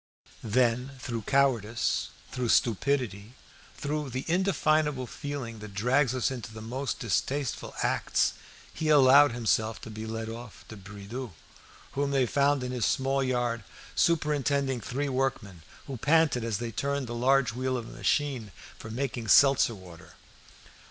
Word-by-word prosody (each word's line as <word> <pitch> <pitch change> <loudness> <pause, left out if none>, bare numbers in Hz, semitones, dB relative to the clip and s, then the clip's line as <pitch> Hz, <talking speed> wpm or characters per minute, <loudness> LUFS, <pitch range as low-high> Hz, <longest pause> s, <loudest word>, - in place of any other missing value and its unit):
Then, 125 +3 +1
through 115 -4 -5
cowardice, 120 -5 +1 0.2
through 125 -2 -2
stupidity, 115 -3 +1 0.4
through 150 0 -3
that 130 +1 -5
indefinable 155 -6 +1
feeling 130 -5 -6
that 105 -2 -10
drags 125 +4 +2
us 130 +1 0
into 125 -3 -6
the 110 - -9
most 125 +5 -3
distasteful 130 +5 -2
acts, - - +1 0.4
he 160 -1 -2
allowed 145 -1 +7
himself 115 -1 0
to 110 - -8
be 110 +1 -6
led 110 0 -4
off 115 -1 -9
to 110 - -8
Bridoux', 105 +4 -8 0.6
whom 140 0 -1
they 135 -2 +2
found 140 +1 +2
in 125 - -3
his 125 -3 -2
small 135 +1 +1
yard, 120 -3 -1 0.3
superintending 140 -5 +1
three 135 +5 -3
workmen, 130 -9 -2 0.2
who 135 -2 -6
panted 150 -2 +3
as 115 -3 -1
they 120 -1 -4
turned 140 +3 -2
the 120 - -6
large 125 0 +2
wheel 130 +1 -1
of 115 -2 -6
a - - -10
machine 135 -8 -1 0.3
for 110 - -8
making 120 -1 -3
seltzer 135 -2 +5
water. 90 -4 -14
125 Hz, 145 wpm, -28 LUFS, 115-140 Hz, 0.6 s, allowed